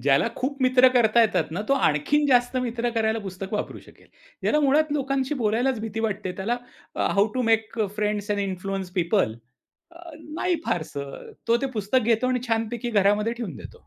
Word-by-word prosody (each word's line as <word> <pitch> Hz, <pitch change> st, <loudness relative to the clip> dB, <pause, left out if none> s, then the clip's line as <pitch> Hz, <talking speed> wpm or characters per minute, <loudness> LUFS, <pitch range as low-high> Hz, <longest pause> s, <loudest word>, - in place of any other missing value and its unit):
ज्याला 135 Hz, 0 st, +3 dB
खूप 275 Hz, +2 st, -2 dB
मित्र 255 Hz, 0 st, +6 dB
करता 235 Hz, -2 st, +4 dB
येतात 225 Hz, -, +3 dB
ना, 175 Hz, +5 st, -3 dB
तो -, -, +4 dB
आणखीन 275 Hz, -, +2 dB
जास्त 245 Hz, -1 st, +3 dB
मित्र 240 Hz, -1 st, -1 dB
करायला 225 Hz, -1 st, 0 dB
पुस्तक 195 Hz, -1 st, -7 dB
वापरू 210 Hz, -, -3 dB
शकेल. -, -, -19 dB, 0.4 s
ज्याला 300 Hz, -, +2 dB
मुळात 290 Hz, +2 st, +3 dB
लोकांशी 275 Hz, 0 st, -1 dB
बोलायलाच 240 Hz, +1 st, 0 dB
भीती 225 Hz, 0 st, -4 dB
वाटते. 205 Hz, -4 st, -2 dB
त्याला 230 Hz, +6 st, -1 dB, 0.4 s
अ, -, -, 0 dB
"how 200 Hz, +1 st, +4 dB
to 255 Hz, -, 0 dB
make 225 Hz, 0 st, +1 dB
a 210 Hz, -, +2 dB
friends 210 Hz, 0 st, -1 dB
and 205 Hz, 0 st, +1 dB
influence 195 Hz, -1 st, -3 dB
people." 175 Hz, -, +1 dB, 0.6 s
अ, 340 Hz, -, -15 dB, 0.4 s
नाही 355 Hz, +1 st, 0 dB
फारसं. 140 Hz, -4 st, -4 dB, 0.2 s
तो 235 Hz, -, +5 dB
ते -, -, +2 dB
पुस्तक 210 Hz, +6 st, +2 dB, 0.2 s
घेतो 230 Hz, +3 st, -1 dB
आणि 255 Hz, -1 st, 0 dB
छानपैकी 225 Hz, +1 st, -1 dB
घरामध्ये 210 Hz, +1 st, +2 dB
ठेवून 230 Hz, -, -6 dB
देतो. -, -, -12 dB
225 Hz, 180 wpm, -25 LUFS, 200-255 Hz, 0.6 s, मित्र